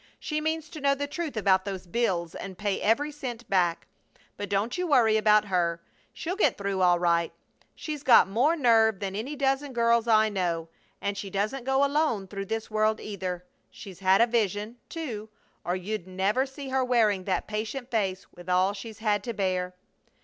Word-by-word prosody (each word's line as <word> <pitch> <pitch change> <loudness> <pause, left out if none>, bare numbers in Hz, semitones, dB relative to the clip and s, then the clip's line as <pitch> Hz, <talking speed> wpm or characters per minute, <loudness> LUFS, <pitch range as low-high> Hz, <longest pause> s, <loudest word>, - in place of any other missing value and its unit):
She 305 -1 -2
means 315 0 -2
to 310 - -9
know 280 0 +3
the 285 +1 -2
truth 295 -2 -5
about 190 -2 +3
those 190 -2 -5
bills 175 -4 -1
and 190 -2 -7
pay 205 0 -1
every 285 +8 +2
cent 245 -5 -7
back! 175 -3 +1 0.5
But 205 -1 -6
don't 205 +4 0
you 360 0 -1
worry 235 -8 +4
about 215 -1 +4
her. 175 -3 0 0.3
She'll 355 +3 -4
get 415 - +2
through 195 -1 -2
all 175 -1 +5
right. 170 -1 +1 0.4
She's 300 -2 -5
got 260 -9 +6
more 250 - +2
nerve 225 - +4
than 195 -1 -4
any 250 +8 -4
dozen 270 0 0
girls 235 -1 +2
I 220 -1 +5
know, 175 -5 -2 0.3
and 200 0 -2
she 200 0 -5
doesn't 215 +7 -2
go 270 +1 +3
alone 280 -9 0
through 195 +1 -5
this 225 +1 -4
world, 215 0 +1
either. 185 -3 -5 0.2
She's 190 -4 -11
had 190 +2 +4
a - - +7
vision, 220 -1 -1
too, 235 -11 -5 0.3
or 175 - -1
you'd 185 0 -4
never 195 +8 0
see 270 0 -8
her 260 0 +1
wearing 220 -7 +2
that 185 -3 -1
patient 220 +5 -4
face 195 -4 -1
with 175 +1 -11
all 185 +2 +3
she's 210 +2 -8
had 210 -2 0
to 235 - -3
bear!" 185 -3 -1
215 Hz, 190 wpm, -27 LUFS, 190-255 Hz, 0.5 s, a